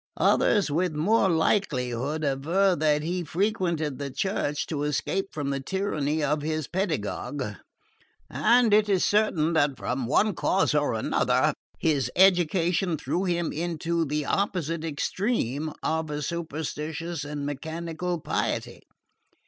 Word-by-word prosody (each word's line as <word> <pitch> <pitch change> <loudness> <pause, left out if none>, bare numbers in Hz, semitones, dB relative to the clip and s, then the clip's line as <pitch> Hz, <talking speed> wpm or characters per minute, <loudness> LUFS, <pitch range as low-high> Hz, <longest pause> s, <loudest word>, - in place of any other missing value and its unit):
Others 200 -8 +3
with 170 +1 0
more 195 +6 +3
likelihood 150 - 0
aver 165 +8 +2
that 150 -2 +2
he 175 +2 -2
frequented 170 - -1
the 140 -1 -3
churches 145 0 -1
to 150 -3 -3
escape 150 +6 -1
from 145 -2 -3
the 135 - -1
tyranny 155 -2 -1
of 150 +1 +1
his 155 -1 -2
pedagogue; 150 - -2 0.8
and 235 -1 +3
it 210 0 +4
is 190 -3 +3
certain 175 -7 +2
that 145 -4 +2
from 125 +3 -2
one 210 - +3
cause 185 0 +1
or 145 -5 +1
another 110 - +2 0.2
his 140 -6 +1
education 175 -1 +3
threw 180 +6 -2
him 175 -2 0
into 170 +1 -1
the 150 -1 -2
opposite 170 -4 -1
extreme 155 - -1
of 160 -1 -1
a 150 0 -3
superstitious 160 0 -4
and 145 -1 -5
mechanical 165 +4 -4
piety. - - -2
160 Hz, 130 wpm, -26 LUFS, 145-180 Hz, 0.8 s, it